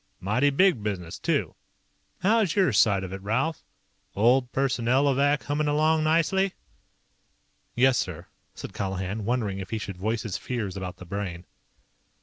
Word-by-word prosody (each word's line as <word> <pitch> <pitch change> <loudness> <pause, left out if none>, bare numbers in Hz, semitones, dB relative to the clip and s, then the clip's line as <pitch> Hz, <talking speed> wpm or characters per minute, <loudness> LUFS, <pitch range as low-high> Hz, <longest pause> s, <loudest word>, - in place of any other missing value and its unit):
"Mighty 110 +9 +2
big 160 - +3
business, 95 -5 -4
too. - - 0 0.7
How's 210 -3 +3
your 190 - +3
side 100 -2 +4
of 95 0 -6
it, 95 - -6
Ralph? 130 +11 -1 0.5
Old 125 +4 +3
Personnelovac 135 +2 +2
hummin' 145 +1 -1
along 155 +2 +2
nicely?" 170 +5 +2 1.2
"Yes, 130 0 +4
sir," - - -4 0.3
said - - -8
Colihan, 95 +1 -3
wondering 110 -5 -1
if 95 - -7
he 115 - -2
should 100 -3 -6
voice 110 +4 -2
his 105 -5 -4
fears 110 -7 -4
about 90 -2 -6
the 90 - -11
Brain. 90 -2 -5
120 Hz, 140 wpm, -26 LUFS, 100-145 Hz, 1.2 s, side